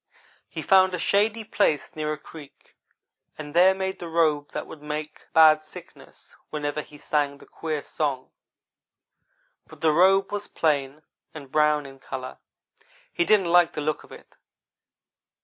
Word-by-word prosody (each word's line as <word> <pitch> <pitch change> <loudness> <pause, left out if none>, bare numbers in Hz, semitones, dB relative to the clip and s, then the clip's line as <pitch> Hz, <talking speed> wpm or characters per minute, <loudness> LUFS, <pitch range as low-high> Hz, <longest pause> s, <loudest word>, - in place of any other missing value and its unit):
He - - -6
found 190 -2 +4
a - - -3
shady 210 +5 +1
place 155 -7 0
near 155 -1 -2
a 155 - -3
creek, 150 -2 -15 0.6
and 150 -1 -8
there 185 +3 +5
made 190 0 -3
the 170 - -7
robe 155 -3 +1
that - - -5
would 155 - -12
make 150 +1 -6
Bad 155 -1 +6
Sickness 155 - -13
whenever 150 0 -3
he 150 - -15
sang 145 -1 -1
the - - -16
queer 155 -3 -5
song, 140 -4 -3 1.4
but - - -16
the 160 - +4
robe 195 +4 +4
was 205 0 -4
plain, 145 -1 -1 0.3
and 140 -4 -10
brown 150 -1 +2
in 135 0 -12
color. 130 -1 -7 0.7
He 345 - +1
didn't 195 - +3
like 175 -1 +5
the 150 - -4
looks 150 +1 -2
of - - -18
it. - - -15
155 Hz, 155 wpm, -25 LUFS, 150-180 Hz, 1.4 s, Bad